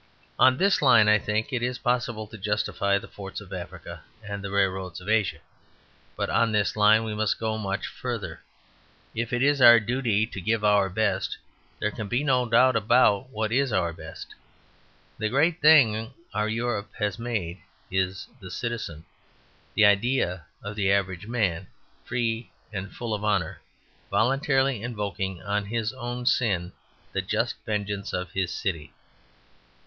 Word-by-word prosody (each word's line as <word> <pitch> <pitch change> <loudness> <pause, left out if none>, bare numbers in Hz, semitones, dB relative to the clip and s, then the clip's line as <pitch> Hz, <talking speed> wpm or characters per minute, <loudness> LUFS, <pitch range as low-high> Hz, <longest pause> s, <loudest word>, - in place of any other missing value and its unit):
On 130 0 +6
this 195 +4 +3
line, 120 -6 +6
I 105 0 +5
think, 110 +6 -2
it 125 - 0
is 125 +1 -1
possible 120 -3 -1
to 110 - -12
justify 100 0 0
the - - -8
forts 95 -1 -8
of - - -11
Africa - - -8 0.2
and 100 -1 -6
the 100 - -4
railroads 95 -2 -1
of 90 - -13
Asia; 110 -3 +1 0.8
but - - -2
on 115 -1 +2
this 105 -2 +1
line 110 +1 +5
we 110 -1 -3
must 105 -1 0
go 110 -1 -1
much 95 -2 -2
further. - - -5 0.7
If 115 +2 -3
it 120 +1 +1
is 145 -1 +3
our 120 -1 +9
duty 115 -2 0
to 100 -4 -8
give 110 +4 0
our 105 -2 +4
best, 100 -1 -1 0.4
there 105 - -1
can 105 0 -6
be 120 +7 0
no 130 -3 +2
doubt 125 +2 +5
about 115 +1 +3
what 110 -3 -2
is 135 +1 +2
our 85 -4 0
best. 80 0 -10 0.9
The 110 - 0
greatest 160 +7 +2
thing 120 -7 +5 0.2
our 105 +1 0
Europe 110 -2 -2
has 105 +1 -2
made 100 -7 -3 0.3
is 95 +1 -1
the 95 -4 -10
Citizen: 105 -11 -5 0.7
the 110 - +6
idea 100 - +2 0.2
of 105 +1 -6
the 100 -2 +1
average 95 -1 0
man, 95 -7 -1 0.4
free 115 -1 -2 0.2
and 100 0 -5
full 115 -2 -4
of 105 0 -3
honour, 100 -6 0 0.5
voluntarily 135 -1 +2
invoking 100 -6 -4
on 100 0 -1
his 115 +2 -2
own 120 -1 -5
sin 95 -9 +1 0.4
the - - 0
just - - -1
vengeance 105 -2 -3
of 90 -1 -3
his 95 -2 -1
city. 85 -6 -4
105 Hz, 160 wpm, -26 LUFS, 100-120 Hz, 0.9 s, our